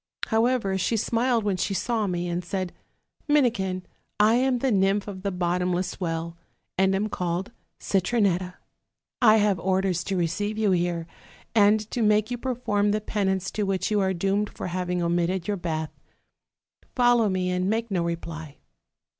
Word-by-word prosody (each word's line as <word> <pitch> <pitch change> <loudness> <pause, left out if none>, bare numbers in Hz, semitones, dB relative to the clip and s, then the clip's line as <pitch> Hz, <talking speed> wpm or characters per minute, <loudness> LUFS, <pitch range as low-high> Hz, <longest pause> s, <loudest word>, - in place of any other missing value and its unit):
However, 225 -4 +1
she 225 +5 +1
smiled 235 +1 +1
when 200 -3 0
she 195 +2 -1
saw 225 0 0
me; 175 -1 -2
and 175 +1 -2
said: 185 0 -3 0.5
'Minikin, 225 -11 +1 0.4
I 215 +2 +5
am 255 +1 +2
the 260 +1 0
nymph 195 0 +2
of 190 -2 -7
the 200 - -1
bottom 180 0 0
less 180 +1 -2
well, 165 -1 -3 0.4
and 190 +1 +3
am 205 +2 0
called 180 -1 -3 0.3
Citronetta; 185 -2 +1 0.7
I 220 -2 +7
have 205 -3 +2
orders 190 -2 0
to 195 -1 -1
re 175 - +2
ceive 205 +6 -3
you 215 -2 +2
here, 175 -2 0 0.5
and 210 0 +5
to 245 - -1
make 215 +1 +3
you 245 - -3
perform 235 -5 0
the 210 +1 +1
penance 190 -3 -1
to 215 - -3
which 195 +2 -1
you 210 - +3
are 190 -1 +2
doomed 195 +3 0
for - - -6
having 180 0 -2
omitted 175 +1 0
your 205 -1 -1
bath; 160 -3 -3 1.0
fol 245 -1 +5
low 225 -3 +2
me, 185 -1 0
and 180 +1 0
make 225 +1 -1
no 180 -3 +1
reply.' 165 -3 -5
195 Hz, 170 wpm, -25 LUFS, 180-215 Hz, 1.0 s, I